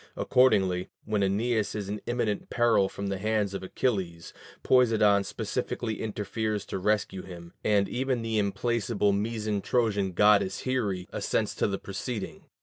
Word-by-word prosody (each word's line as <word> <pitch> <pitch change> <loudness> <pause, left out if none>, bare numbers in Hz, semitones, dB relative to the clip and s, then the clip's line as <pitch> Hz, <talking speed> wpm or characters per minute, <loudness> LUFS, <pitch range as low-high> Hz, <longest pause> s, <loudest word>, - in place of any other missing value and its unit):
Accordingly, 95 -8 +3 0.2
when 105 -1 0
Æneas 105 +3 0
is 105 -2 -4
in 105 +1 -4
imminent 120 -4 -1
peril 115 -5 +3
from 100 - -6
the 100 -1 -2
hands 105 -1 0
of 95 - -4
Achilles, 95 -5 -2 0.3
Poseidon 110 -5 +4
specially 110 +2 -3
interferes 105 0 -2
to - - -4
rescue 100 -1 0
him, 85 -2 -11
and 100 -2 +3
even 130 -1 -1
the 110 -1 0
implacable 105 0 0
miso 105 0 -1
Trojan 105 -6 0
goddess 100 0 +4
Here 130 -5 0 0.2
assents - - -1
to - - 0
the 100 -1 -2
proceeding. 105 +3 -6
105 Hz, 145 wpm, -28 LUFS, 100-115 Hz, 0.3 s, Poseidon